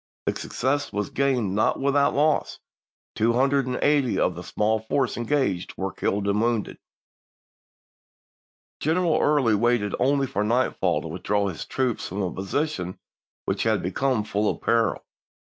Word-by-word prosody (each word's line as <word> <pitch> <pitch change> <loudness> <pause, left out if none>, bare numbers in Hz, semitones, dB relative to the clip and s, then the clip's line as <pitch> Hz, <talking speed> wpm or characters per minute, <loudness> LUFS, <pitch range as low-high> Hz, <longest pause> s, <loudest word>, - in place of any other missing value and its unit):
The - - 0
success 145 +3 -2
was 105 -1 -3
gained 125 -8 +1
not 105 +2 +1
without 140 +1 +2
loss; 150 +2 +1 0.6
two 115 +2 +2
hundred 135 +2 +2
and 125 - -2
eighty 145 -5 +2
of 90 - +2
the 85 - -8
small 110 +4 0
force 125 +4 -1
engaged 120 -7 -1
were 95 0 -2
killed 100 0 -1
and 100 +1 +1
wounded. 115 -2 -1 2.0
Greneral 165 +1 +2
Early 145 -7 +3
waited 105 -1 +1
only 140 +2 +2
for 105 -5 -2
nightfall 120 +4 +1
to - - -6
with - - -7
draw 100 -1 +1
his 85 - -7
troops 130 -4 -1
from 100 +2 -3
a 90 - -2
position 95 - -2 0.5
which - - -1
had - - +1
become 115 +5 0
full 105 0 0
of - - -3
peril. 115 -1 +1
120 Hz, 155 wpm, -25 LUFS, 105-140 Hz, 2.0 s, Early